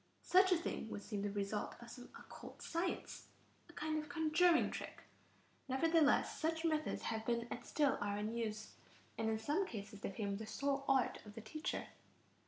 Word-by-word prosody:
Such 375 +1 +6
a 360 - +6
thing 320 -8 -3
would 205 - -5
seem 205 -1 -3
the 205 - 0
result 200 +1 -2
of 235 0 -10
some 245 0 -10
occult - - -11
science, 345 +2 -2 0.4
a - - -13
kind 310 0 -1
of 300 - -11
conjuring 320 +3 +4
trick. - - -6 0.6
Nevertheless, 305 +3 +3
such 320 +1 0
methods 310 -1 0
have 220 -1 -1
been 235 0 0
and - - -4
still 290 -3 +2
are 205 0 0
in 210 +2 -2
use, 215 -2 -3 0.4
and 220 - 0
in 220 - +1
some 300 - 0
cases 205 -1 -7
they - - -2
form 200 0 -2
the 220 +1 -6
sole 275 +5 -1
art 270 -2 +3
of 210 -1 -11
the 225 - -6
teacher. 265 +9 -3
245 Hz, 185 wpm, -38 LUFS, 215-315 Hz, 0.6 s, Such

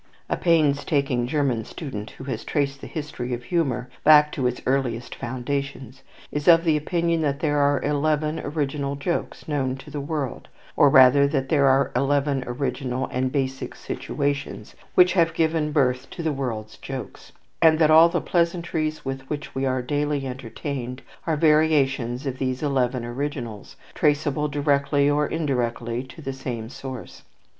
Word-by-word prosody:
A - - +1
painstaking 145 -6 +2
German 135 -5 0
student, 110 -5 -7
who - - -11
has 130 -5 -4
traced 140 -1 -1
the - - -7
history 130 -5 -4
of 120 - -10
humour 130 -5 -1 0.2
back 150 -1 +7
to 130 -3 0
its 125 - -2
earliest 125 -3 -1
foundations, 130 +1 -4 0.3
is 150 -1 -3
of 165 -1 +7
the 160 -3 +3
opinion 170 +2 0
that 140 -2 0
there 150 -2 +1
are 140 -1 +3
eleven 150 +1 0
original 140 -1 -2
jokes 170 +5 -3
known 135 -4 -1
to 135 - -12
the 145 - -4
world, 145 -3 -4 0.3
or 145 - +6
rather 135 +1 +7
that 135 -2 -1
there 140 -3 +4
are 135 0 +3
eleven 140 -1 +1
original 130 0 -2
and 130 0 -1
basic 135 -2 -2
situations 140 -1 -4 0.2
which 180 0 +6
have 165 -3 +2
given 160 -1 +1
birth 130 -3 +1
to 170 - -7
the 160 -2 0
world's 115 -6 -4
jokes; 135 -2 -8 0.3
and 160 -1 +6
that 155 -1 +4
all 160 +2 +8
the 170 0 0
pleasantries 170 -3 -1
with 135 0 -3
which 150 -1 -5
we 135 0 -1
are 130 -1 0
daily 145 +1 -1
entertained 130 0 -5 0.2
are 160 -2 +1
variations 145 -5 +2
of 130 -1 -3
these 130 +1 -2
eleven 130 -4 0
originals, 120 -4 -5 0.2
traceable 150 0 +1
directly 140 0 +1
or 145 0 +2
indirectly 120 -6 -1
to 140 +4 -12
the 135 - -3
same 120 -4 -5
sources. 130 -1 -8
140 Hz, 160 wpm, -24 LUFS, 130-150 Hz, 0.3 s, all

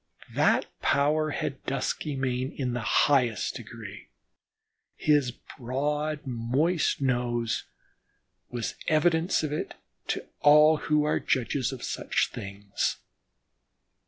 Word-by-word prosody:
That - - +3 0.2
power 150 +2 +2
had 135 -2 -3
Duskymane 130 -1 -2
in 125 -3 -1
the 125 - -1 0.3
highest 125 -8 +2
degree; - - -9 0.9
his 145 -4 +3
broad, 145 +6 -3
moist 135 +7 0
nose 120 -3 0 0.8
was 120 -2 -3
evidence 160 +2 +2
of 150 -1 -2
it 150 - -4 0.3
to - - -2
all 150 +1 +7
who 150 0 +1
are 150 - +1
judges 130 +1 0
of 130 -2 -7
such - - -1
things. 100 0 -3
135 Hz, 100 wpm, -27 LUFS, 125-150 Hz, 0.9 s, all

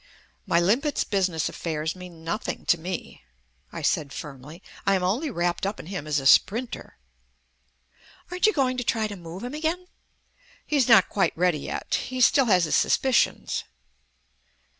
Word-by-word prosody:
"My 170 - +3
limpet's 235 - +1
business 185 -5 0
affairs 160 0 -3
mean 180 -3 -11
nothing 170 +7 -4
to 175 - +3
me," 175 - -6 0.5
I - - -7
said 145 -3 0
firmly. 150 +2 -9 0.2
"I 195 - +3
am 185 - -1
only 235 - 0
wrapped 175 -6 -1
up 200 +2 -2
in - - -8
him 180 -4 -6
as 150 -1 +1
a 135 - -7
sprinter." 230 - +2 1.3
"Aren't 360 +3 +2
you 430 - +3
going 255 -3 +1
to 250 - -1
try 225 -1 0
to 210 -1 -5
move 175 +2 -9
him 250 +2 -5
again?" 320 +4 -2 0.8
"He's 285 -5 +2
not 230 - +7
quite 195 - 0
ready 175 -3 +2
yet. - - -5 0.2
He 255 0 -4
still 270 +2 +5
has 185 -6 +4
his 155 - +1
suspicions." 265 -3 +1
190 Hz, 160 wpm, -25 LUFS, 165-250 Hz, 1.3 s, not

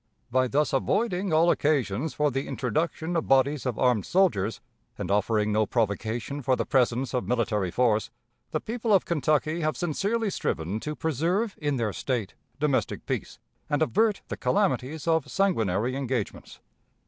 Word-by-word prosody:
By 130 +1 +3
thus 150 +4 +1
avoiding 190 - 0
all 165 +2 +5
occasions 145 -1 0
for 150 -1 +2
the 135 +2 -2
introduction 155 +7 -2
of 165 - 0
bodies 135 0 +3
of 120 -4 -2
armed 125 -5 +2
soldiers, 115 - +2 0.4
and - - -3
offering 105 +1 +2
no 105 0 +2
provocation 115 +4 -1
for 130 0 +2
the - - -2
presence 130 -1 +1
of 125 - -1
military 110 -6 0
force, 110 +1 +1 0.4
the - - -1
people 230 -1 -1
of 190 - +2
Kentucky 155 +1 +1
have 155 0 0
sincerely 200 +6 -1
striven 90 - -2
to 150 +6 -4
preserve 170 - 0
in 145 -2 0
their 110 -4 -1
State 120 -7 -2 0.3
domestic 145 -2 0
peace - - -3 0.3
and 145 +2 +2
avert 205 - +1
the - - -5
calamities 160 -7 0
of 160 -3 +2
sanguinary 120 - +1
engagements. 130 -5 -4
135 Hz, 155 wpm, -27 LUFS, 115-160 Hz, 0.4 s, all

